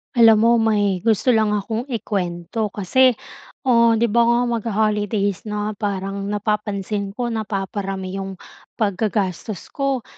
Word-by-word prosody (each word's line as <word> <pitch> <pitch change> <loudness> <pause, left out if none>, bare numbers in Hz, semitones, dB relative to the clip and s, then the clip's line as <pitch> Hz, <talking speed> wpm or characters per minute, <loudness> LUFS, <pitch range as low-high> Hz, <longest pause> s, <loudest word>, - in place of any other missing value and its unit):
Alam 225 -2 +6
mo, 235 - +5
may 205 -4 +2
gusto 225 +4 +2
lang 220 -2 +2
akong 220 +5 -3
ikuwento. 205 -3 -2
Kasi, 240 +6 +3 0.5
oh 235 -3 +4
'di 230 0 +1
ba 235 +1 +4
nga, 235 0 +3
magho-holidays 215 -3 -1
na. 210 0 -2
Parang 195 -1 -3
napapansin 205 -1 -2
ko, 240 -1 -2
napaparami 195 -3 -3
'yong 195 0 -5 0.4
paggagastos 205 -2 -2
ko. 275 -3 -1
210 Hz, 125 wpm, -21 LUFS, 195-230 Hz, 0.5 s, Alam